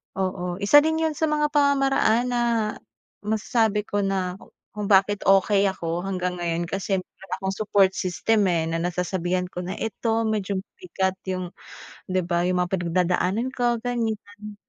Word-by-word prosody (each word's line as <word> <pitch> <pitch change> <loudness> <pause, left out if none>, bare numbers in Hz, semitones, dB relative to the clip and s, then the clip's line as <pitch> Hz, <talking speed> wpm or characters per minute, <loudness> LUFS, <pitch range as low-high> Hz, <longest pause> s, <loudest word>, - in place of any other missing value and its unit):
Oo, 185 -2 -2
isa 205 +9 +7
din 320 +2 +1
yun 320 - +1
sa 320 - +1
mga 300 0 +1
pamamaraan 275 -5 +3
na 240 - +1 0.8
masasabi 215 -1 +1
ko 205 - -1
na 190 -1 -2 0.3
kung 210 -1 -4
bakit 200 +1 +4
okey 195 +1 +4
ako 170 -2 -3
hanggang 180 -2 -2
ngayon 170 0 -1
kasi 195 +1 -1
meron 190 +1 -10
akong 190 0 -2
support 200 -3 +3
system 200 +3 +1
eh, 165 -2 +1
na 165 0 -1
nasasabihan 180 +1 -1
ko 180 - -5
na 185 - -4
ito 225 0 -1
medyo 205 -2 -1
mabigat 190 - -3 0.2
'yong, 185 -1 -3 0.6
'di 185 0 +2
ba, 170 -1 +1
'yong 180 0 +1
mga 180 0 -1
pinagdadaanan 180 +5 0
ko, 240 -1 +1
ganyan. 215 -3 -4
195 Hz, 155 wpm, -24 LUFS, 180-225 Hz, 0.8 s, isa